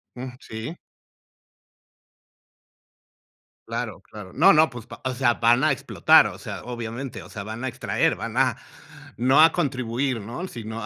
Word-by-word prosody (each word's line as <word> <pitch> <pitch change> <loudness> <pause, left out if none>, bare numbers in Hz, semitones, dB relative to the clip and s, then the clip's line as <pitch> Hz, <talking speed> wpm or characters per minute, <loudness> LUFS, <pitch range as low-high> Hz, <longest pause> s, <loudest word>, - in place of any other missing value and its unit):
Mm, 125 +1 -6
sí. 115 +6 -7 2.9
Claro, - - -4
claro, 105 -4 -11
no, - - +6
no, 155 +1 +5
pues, 120 -2 -10 0.2
o 130 - -2
sea, 120 -2 +3
van 120 +3 +3
a 155 - +4
explotar, 135 0 +4
o 90 -2 -8
sea, 100 0 -7
obviamente, 120 +1 -6
o - - -14
sea, 105 - -7
van 110 +4 -7
a - - -1
extraer, 120 - 0
van - - -6
a - - +2 0.6
no 130 +5 +4
a 160 0 +7
contribuir, 130 - -1
¿no?, 120 - -6
si 120 -9 -8
no, 110 0 -6
a - - -4
120 Hz, 160 wpm, -24 LUFS, 110-135 Hz, 2.9 s, a